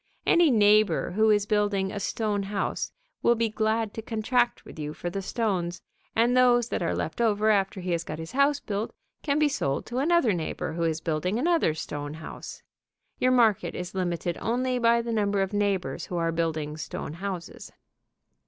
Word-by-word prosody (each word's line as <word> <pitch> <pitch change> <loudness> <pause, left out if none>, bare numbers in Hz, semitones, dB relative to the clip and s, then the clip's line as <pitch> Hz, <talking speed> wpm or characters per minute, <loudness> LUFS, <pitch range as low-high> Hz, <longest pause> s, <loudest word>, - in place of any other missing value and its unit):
Any 340 -2 +5
neighbor 215 -5 +4
who 220 +4 +3
is 205 -1 +3
building 205 -2 +1
a 205 - -4
stone 210 0 -1
house 200 0 -2 0.3
will 235 - +4
be 230 0 +1
glad 220 0 0
to 225 - -5
contract 240 +2 0
with - - -11
you 150 0 -4
for 175 - -4
the 195 +2 -3
stones, 185 -5 -2 0.3
and 235 +2 +3
those 245 -2 +4
that - - -2
are 170 - 0
left 165 - -3
over 215 -1 +3
after 195 -2 +1
he 180 0 -3
has 170 -1 0
got 155 -2 -6
his 160 +1 -7
house 280 +2 +3
built 210 -2 -4 0.3
can 285 -2 0
be 305 0 +4
sold 140 - -1
to 245 +1 -3
another 310 - +3
neighbor 160 -1 -3
who 170 - -4
is 160 -1 -1
building 165 +6 -1
another 320 - +2
stone 145 -1 -5
house. 160 - -9 0.6
Your 255 - +3
market 230 -5 +3
is 180 0 -5
limited 175 -2 -2
only 250 +2 0
by 235 0 +3
the 230 0 -3
number 205 -2 +1
of 195 +2 -5
neighbors 190 -7 -1
who 180 - -3
are 165 -1 +1
building 160 -2 -2
stone 155 - -5
houses. 185 0 -6
205 Hz, 190 wpm, -27 LUFS, 175-235 Hz, 0.6 s, Any